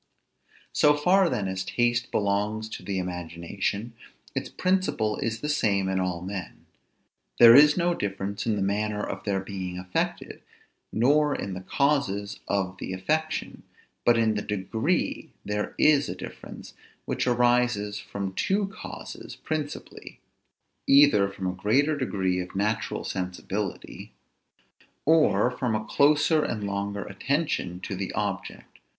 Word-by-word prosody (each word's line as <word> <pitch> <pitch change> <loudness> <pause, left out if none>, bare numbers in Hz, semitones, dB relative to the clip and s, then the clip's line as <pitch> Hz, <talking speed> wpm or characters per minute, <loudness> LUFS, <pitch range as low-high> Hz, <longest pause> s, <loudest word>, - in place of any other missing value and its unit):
So 150 0 +5
far 180 +4 +4
then 105 -6 -1
as 95 0 -3
taste 120 +3 0
belongs 105 +2 -1
to - - -7
the 100 -1 -3
imagination, 90 +5 -3 0.4
its - - -3
principle 185 - 0
is 115 0 -3
the 150 - -2
same 100 -10 +1
in 95 0 0
all 90 -2 -2
men; 95 0 -7 0.7
there 115 -1 +10
is 150 +4 +7
no 175 0 +2
difference 100 - -3
in 110 - +2
the 100 - -1
manner 105 +1 -1
of 95 0 -6
their 100 -2 0
being 95 -2 -5
affected, 90 0 -3 0.5
nor 145 +5 +3
in 100 - -4
the 90 - -6
causes 105 -6 0
of 95 -2 -1
the 95 - -4
affection; 155 +12 -2 0.4
but 120 -1 +4
in 110 -1 +3
the 105 - -2
degree 110 - -1 0.2
there 105 0 -3
is 145 -2 +4
a - - -4
difference, - - -10 0.3
which - - -1
arises 120 -4 +2
from 100 -2 -5
two 195 - 0
causes 215 - -9
principally; 155 -2 -6 0.7
either 135 -9 +6
from 100 -1 -7
a 90 - 0
greater 130 +12 +2
degree 95 -9 -1
of 90 +1 -6
natural 105 0 -1
sensibility, 95 +2 -5 0.9
or 150 -8 +4
from 125 -3 -1
a 110 0 -2
closer 150 +4 +3
and 105 -2 -3
longer 100 0 -3
attention 105 - -2
to - - -4
the - - -4
object. - - -4
105 Hz, 140 wpm, -26 LUFS, 95-140 Hz, 0.9 s, there